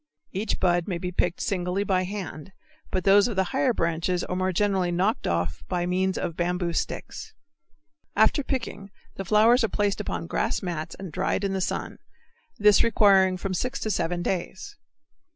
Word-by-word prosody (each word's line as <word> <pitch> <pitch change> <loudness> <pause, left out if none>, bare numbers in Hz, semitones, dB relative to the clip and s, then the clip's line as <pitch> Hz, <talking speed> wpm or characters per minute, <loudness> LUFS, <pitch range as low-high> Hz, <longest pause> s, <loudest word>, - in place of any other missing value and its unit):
Each 200 +3 -2
bud 175 -2 +2
may 180 -4 -2
be 180 +1 -4
picked 175 0 0
singly 185 -1 -1
by 185 -2 +1
hand, 190 -3 -7 0.4
but 185 - -1
those 200 +3 +5
of 235 - -4
the 190 - +3
higher 270 -1 +2
branches 170 -2 -1
are 180 - -3
more 185 0 0
generally 190 -1 +1
knocked 190 +6 0
off 85 -3 -1
by 175 -1 -1
means 185 +1 0
of 170 - -3
bamboo 175 0 -1
sticks. 445 - -4 0.8
After 220 +7 +3
picking 230 -7 -4 0.3
the 195 - -4
flowers 225 +5 +5
are 225 - +1
placed 205 -1 0
upon 85 -2 -4
grass - - -1
mats 165 -3 -4
and 190 -4 -7
dried - - -1
in 195 -1 0
the 190 - -1
sun, - - -3 0.6
this 210 -1 +5
requiring 195 -4 +4
from 185 +1 -3
six 250 +8 -2
to 215 - -1
seven 175 -1 -1
days. 190 - -4
190 Hz, 175 wpm, -26 LUFS, 175-205 Hz, 0.8 s, those